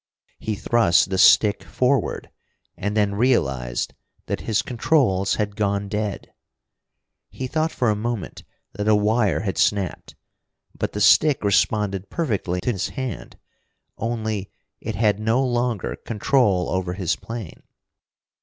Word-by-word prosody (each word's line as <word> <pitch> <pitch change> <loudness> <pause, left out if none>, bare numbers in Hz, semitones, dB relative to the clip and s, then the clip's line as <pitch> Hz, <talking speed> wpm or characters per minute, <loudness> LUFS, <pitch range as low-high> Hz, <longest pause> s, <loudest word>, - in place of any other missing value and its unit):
He 110 - -3
thrust 100 -4 +2
the 95 - 0
stick 100 0 +5
forward 125 +8 -1 0.4
and 105 +2 -3
then 100 -1 +2
realized 70 - 0 0.3
that - - -3
his 105 - +2
controls 115 - +1
had 105 -1 -2
gone 100 -1 -1
dead! 105 -1 -4 1.0
He 130 - -6
thought 155 +5 -1
for 125 - -1
a - - 0
moment 115 -1 -4 0.3
that 105 +2 -4
a 110 - +5
wire 105 -5 +2
had 95 -2 -3
snapped. 100 -3 0 0.6
But - - -4
the 105 - -3
stick 150 +6 +5
responded 100 -1 +1
perfectly 100 - -2
to 125 - 0
his 95 -4 -2
hand, 130 -3 -6 0.6
only 110 -3 -3 0.3
it - - -5
had 105 0 +2
no 115 +5 +1
longer 120 -4 -1
control 105 -5 +1
over 95 -1 -1
his 90 -1 -1
plane. 115 -7 -8
105 Hz, 135 wpm, -23 LUFS, 95-120 Hz, 1.0 s, stick